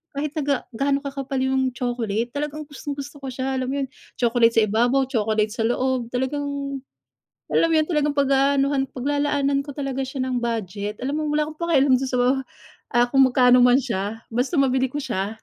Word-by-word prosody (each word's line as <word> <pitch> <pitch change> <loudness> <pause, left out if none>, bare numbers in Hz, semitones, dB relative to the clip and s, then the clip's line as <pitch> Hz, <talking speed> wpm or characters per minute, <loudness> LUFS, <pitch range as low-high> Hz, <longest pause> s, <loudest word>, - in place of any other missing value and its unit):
kahit 290 +1 -2
na 305 - 0
ga 280 -2 +1 0.2
gaano 275 +2 +1
kakapal 275 -1 -4
yung 265 0 +1
chocolate, 240 -2 -2
talagang 300 +1 -3
gustong 290 -1 -6
gusto 285 +1 -8
ko 270 - -7
siya, 265 +1 -2
alam 255 - -2
mo - - -2
yun, - - -4 0.3
chocolate 235 -1 +3
sa 225 - +5
ibabaw, 240 +6 +2
chocolate 215 -3 0
sa 225 0 -2
loob, 255 -1 0
talagang 280 +2 -2 0.7
alam - - +3
mo 330 - +1
yun, 310 -1 +3
talagang 295 -3 +1
pag-aanuhan, 275 0 +2
paglalaanan 285 +1 0
ko 285 - -7
talaga 275 -2 -3
siya 265 0 -4
ng 255 -1 -1
budget, 210 -3 -3
alam 275 - -1
mo, 305 - -2
wala 300 0 +1
akong 310 - -11
pakialam 280 -6 +3
dun 265 - -2
sa, 250 - -1 0.8
ah, 240 0 +5
kung 270 -1 +6
magkano 250 0 +5
man 245 +1 +6
siya, 225 -2 -3
basta 250 +8 -1
mabili 265 -1 +2
ko 285 - -8
siya. 195 -4 -2
265 Hz, 190 wpm, -23 LUFS, 245-280 Hz, 0.8 s, kung